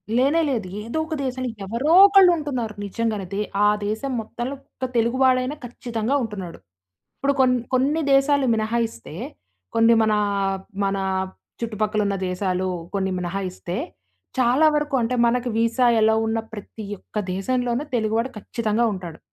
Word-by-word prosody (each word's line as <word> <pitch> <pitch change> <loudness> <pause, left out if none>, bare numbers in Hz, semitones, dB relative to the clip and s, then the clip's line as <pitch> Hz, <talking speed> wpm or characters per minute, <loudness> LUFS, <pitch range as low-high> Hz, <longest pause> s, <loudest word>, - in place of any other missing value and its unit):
లేనే 280 +7 +3
లేదు. 225 -8 -1
ఏదో 230 +8 -5
ఒక 320 - -5
దేశంలో, 255 -1 -2 0.2
ఎవరో 240 - 0
ఒకళ్ళు 390 -2 +7
ఉంటున్నారు 255 -8 -3
నిజంగానైతే. 205 -2 -3 0.3
ఆ - - +6 0.2
దేశం 220 +6 -2
మొత్తంలో 240 +4 -5 0.2
ఒక 260 - -2
తెలుగువాడైన 255 +3 +2
ఖచ్చితంగా 240 +1 -2
ఉంటున్నాడు. 195 -6 -6 0.6
ఇప్పుడు 280 0 +1
కొన్ని 250 -1 +3
కొన్ని 280 +5 +2
దేశాలు 275 0 +4
మినహాయిస్తే, 225 -3 -2 0.6
కొన్ని 230 +1 +5
మన, 215 -1 +2 0.7
మన 195 0 0 0.6
చుట్టుపక్కల 215 -1 -1
ఉన్న 200 - 0
దేశాలు 185 0 -1 0.3
కొన్ని 190 -1 0
మినహాయిస్తే, 180 0 -4 0.6
చాలా 255 +5 +4
వరకు 295 -1 0
అంటే 235 +2 0
మనకు 245 +1 +1
వీసా 230 +2 +2 0.2
అలౌ 220 0 +4
ఉన్న 225 0 0
ప్రతి 215 +1 -8
ఒక్క - - -10 0.2
దేశంలోనూ 245 +6 -1
తెలుగువాడు 225 +2 0
ఖచ్చితంగా 225 +2 -1
ఉంటాడు. 175 -4 -7
230 Hz, 130 wpm, -23 LUFS, 210-255 Hz, 0.7 s, ఒకళ్ళు